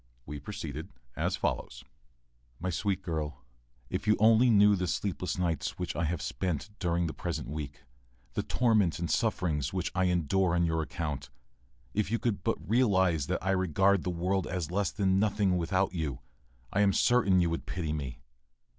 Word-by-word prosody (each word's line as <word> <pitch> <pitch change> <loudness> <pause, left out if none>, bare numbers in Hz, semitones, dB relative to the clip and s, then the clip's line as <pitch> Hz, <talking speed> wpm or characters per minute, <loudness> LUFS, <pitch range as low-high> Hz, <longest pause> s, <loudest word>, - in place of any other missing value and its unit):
We 75 +1 -6
proceeded 80 0 -6 0.3
as - - 0
follows:] - - -3 0.8
My 90 +2 -2
sweet 95 +1 -1
girl, 75 -5 -4 0.5
if - - -3
you 105 - +5
only 115 +3 +5
knew 105 -2 +6
the 90 -1 -1
sleepless 90 +1 -2
nights 85 -3 -1
which 90 -1 -3
I 85 - 0
have 80 0 -2
spent 85 -4 -3
during 85 -2 +1
the 80 - -3
present 80 -7 -4
week, 70 -3 -6 0.5
the - - 0
torments 110 -9 +2
and 85 -1 -2
sufferings 85 - 0
which 95 -1 -1
I 95 0 +2
endure 90 +1 +2
on 85 0 +3
your 80 -1 +1
account; 75 -3 -4 0.6
if 105 -2 0
you 115 - +1
could 110 -6 -1
but 80 - -2
realize 95 - +3
that - - -2
I 95 - +2
regard 95 +1 +3
the - - -3
world 90 +2 0
as 90 -3 -3
less 100 0 +1
than 95 -1 +1
nothing 100 -2 +2
without 90 +3 +1
you, 75 -6 -3 0.5
I 100 - +3
am 100 -1 +4
certain 105 -7 +4
you 85 -2 +2
would 85 - -4
pity 80 -5 -2
me. 65 -4 -5
90 Hz, 175 wpm, -30 LUFS, 80-100 Hz, 0.8 s, knew